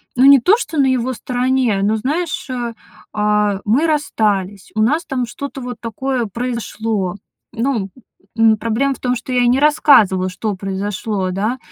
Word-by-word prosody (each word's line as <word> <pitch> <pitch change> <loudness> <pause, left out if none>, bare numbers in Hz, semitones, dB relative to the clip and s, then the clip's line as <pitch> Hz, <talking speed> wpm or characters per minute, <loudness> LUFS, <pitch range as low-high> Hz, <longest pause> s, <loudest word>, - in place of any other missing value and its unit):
ну, 255 +2 +4
не 275 0 +8
то, 370 - +4
что 330 -9 -5
на 280 - +4
его 255 0 0
стороне, 250 -3 0
но, 210 +2 +2
знаешь, 300 +9 -2
э, 240 -2 -3 0.4
а, 210 -1 +1
мы 260 +10 +2
расстались, 205 -10 -1
у 215 - +1
нас 300 +9 +1
там 255 -2 -2
что-то 270 +3 -7
вот 245 -1 -6
такое 245 +2 -2
произошло. 225 -4 -3 0.4
Ну, 230 -4 -1 0.5
н 225 -1 +5
проблема 230 +6 0
в - - -17
том, 250 0 0
что 250 +1 -5
я 245 -1 +3
не 250 +2 +3
рассказывала, 215 -11 +4
что 205 +2 -3
произошло, 195 0 -3
да, 215 +7 -1
235 Hz, 165 wpm, -18 LUFS, 210-260 Hz, 0.5 s, не